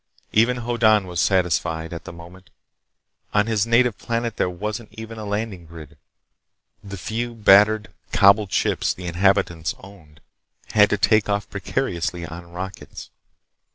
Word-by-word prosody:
Even 120 +3 +3
Hoddan 110 -4 +3
was 90 -2 -5
satisfied, 85 -3 0
as - - -4
of - - -13
the - - -7
moment. 85 +2 -14 0.9
On 105 0 +4
his 110 -1 0
native 120 -1 +2
planet 115 -1 -2
there - - +1
wasn't 105 +5 -5
even 110 0 -9
a 105 - -6
landing 100 -4 -4
grid. 80 -3 -12 0.9
The 100 -1 -8
few, 115 +6 -4
battered, 105 -1 +4 0.2
cobbled 100 0 +4
ships - - 0
the 90 - -9
inhabitants 85 -2 +1
owned 85 -6 -16 0.5
had 105 -1 +5
to 105 - +1
take 110 +1 +2
off 100 0 -1
precariously 90 -4 -3
on 85 +1 -10
rockets. 95 +2 -8
100 Hz, 145 wpm, -22 LUFS, 85-110 Hz, 0.9 s, had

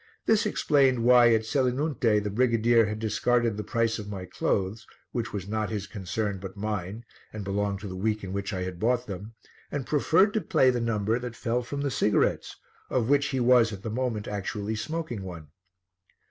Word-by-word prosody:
This 220 0 +3
explained 135 - +2
why 120 -1 +7
at 110 -1 +2
Selinunte 125 -3 +1
the 105 - -3
brigadier 115 0 +3
had 105 0 -3
discarded 115 +1 +1
the 105 - -4
price 115 0 0
of 105 -1 -7
my 95 -3 -5
clothes, 95 +4 -2 0.2
which 115 -3 -3
was 100 -2 -5
not 110 0 -2
his 105 -3 -3
concern 100 0 -3
but 95 +1 -8
mine 105 +1 -4 0.3
and 110 -1 -6
belonged 100 0 -2
to 105 - -6
the 95 - -6
week 105 +2 -1
in 95 0 -5
which 100 +2 -3
I 95 -2 -3
had 90 -1 -6
bought 120 +3 +1
them, 100 +3 -8 0.4
and 140 -3 -3
preferred 165 +7 +3
to 220 - +1
play 130 -7 +3
the 120 -1 -2
number 115 0 0
that 120 -1 -6
fell 120 0 -1
from 140 +4 -5
the 140 -1 -1
cigarettes, 105 -3 +1 0.3
of 125 -2 0
which 145 0 +3
he 135 - -1
was 120 -2 +5
at 100 -2 -8
the 110 - -4
moment 115 -3 -2
actually 105 +1 -3
smoking 155 -2 -4
one. 85 -5 -8
110 Hz, 195 wpm, -27 LUFS, 100-125 Hz, 0.4 s, why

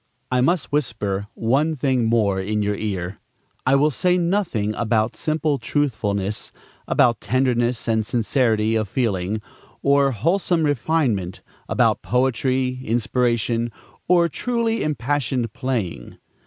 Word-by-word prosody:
I 125 0 +2
must 170 +4 +1
whisper 105 -8 -1
one 140 +8 +1
thing 130 -3 +1
more 110 -4 +2
in 105 +2 -1
your 105 0 0
ear. 95 -3 -4 0.5
I 135 - +5
will 150 +2 +3
say 180 +6 +2
nothing 170 - 0
about 110 0 0
simple 155 -2 0
truthfulness, 105 -8 -1 0.4
about 120 -3 +3
tenderness 120 0 0
and 110 -1 +2
sincerity 115 -1 +1
of 110 -3 -1
feeling, 105 -3 -1 0.4
or 140 0 +4
wholesome 170 - +1
refinement, 130 - 0 0.3
about - - +2
poetry, 130 +1 0
inspiration, 120 0 0 0.4
or 175 -1 +4
truly 230 - -1
impassioned 130 -5 -1
playing. 110 - -3
120 Hz, 115 wpm, -22 LUFS, 110-145 Hz, 0.5 s, I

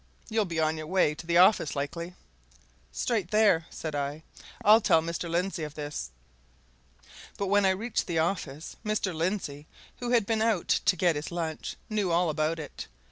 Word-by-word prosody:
You'll 220 -1 +1
be 170 -3 -3
on 155 0 +1
your 155 0 -6
way 180 -4 +2
to 165 +2 -10
the 170 0 +3
office, 185 -3 +5
likely?" 170 +5 -4 0.8
"Straight 205 - -1
there," 205 -6 +3
said 155 -2 -6
I. 145 +2 -3 0.4
"I'll 215 +2 +8
tell 165 - +4
Mr. 170 +1 -4
Lindsey 175 +1 -1
of 150 -1 -6
this." 145 - -5 1.3
But 200 - -1
when 205 -1 +5
I 190 0 +2
reached 230 +2 -2
the 170 -3 -1
office, 160 -3 -2
Mr. 210 -3 -1
Lindsey, 160 -4 -3 0.3
who 245 - -3
had 235 -4 +3
been 220 +1 0
out 220 -6 +1
to 185 - +3
get 175 -3 +2
his 145 +3 -4
lunch, 165 -2 -4
knew 210 -4 0
all 170 -1 +2
about 155 +2 0
it. 150 -3 -7
170 Hz, 180 wpm, -28 LUFS, 155-200 Hz, 1.3 s, I'll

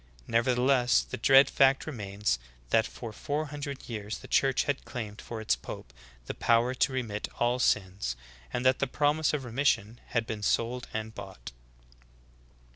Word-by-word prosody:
Nevertheless, 125 - +3
the - - -6
dread 135 +1 +7
fact 135 0 +3
remains 105 - -2 0.3
that 110 0 +4
for 115 -3 -8
four 145 +7 -2
hundred 140 -2 -6
years 105 -2 -4
the - - -12
Church 135 -2 +3
had 140 -1 -2
claimed 110 -4 -6
for 115 - -6
its 110 - +1
pope - - -9 0.3
the - - -4
povver 120 +2 +2
to 135 - +3
re 130 -1 0
mit 105 -2 -4
all 120 +1 +1
sins, 95 - +1 0.4
and 120 - -2
that 130 0 +4
the 140 - +1
promise 150 +3 +2
of 150 -3 -2
remission 120 -3 0
had 115 -1 0
been 110 -2 -5
sold 120 +4 0
and 110 0 -4
bought." 95 - -9
120 Hz, 165 wpm, -29 LUFS, 105-135 Hz, 0.4 s, dread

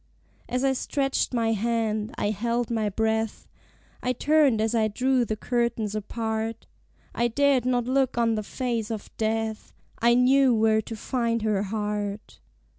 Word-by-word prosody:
As 250 +1 -1
I 270 -1 +3
stretched 270 +1 -1
my 230 -3 +1
hand, 220 0 -1
I 205 - 0
held 235 +3 -1
my 220 -2 0
breath; 220 +1 -1 0.5
I 250 - 0
turned 285 -3 +3
as 220 +1 0
I 220 -2 +2
drew 255 +4 +1
the 215 - -2
curtains 235 -2 -1
apart: 220 +1 -3 0.5
I 235 - +1
dared 265 0 +2
not 245 -2 +1
look 260 0 +1
on 230 -1 +2
the 215 - -1
face 235 0 -3
of 220 -3 -6
death: 220 0 -2 0.3
I 235 +1 +4
knew 255 0 +4
where 220 0 +3
to 225 - -7
find 230 0 -1
her 210 -3 +1
heart. 210 0 -4
230 Hz, 155 wpm, -26 LUFS, 215-250 Hz, 0.5 s, I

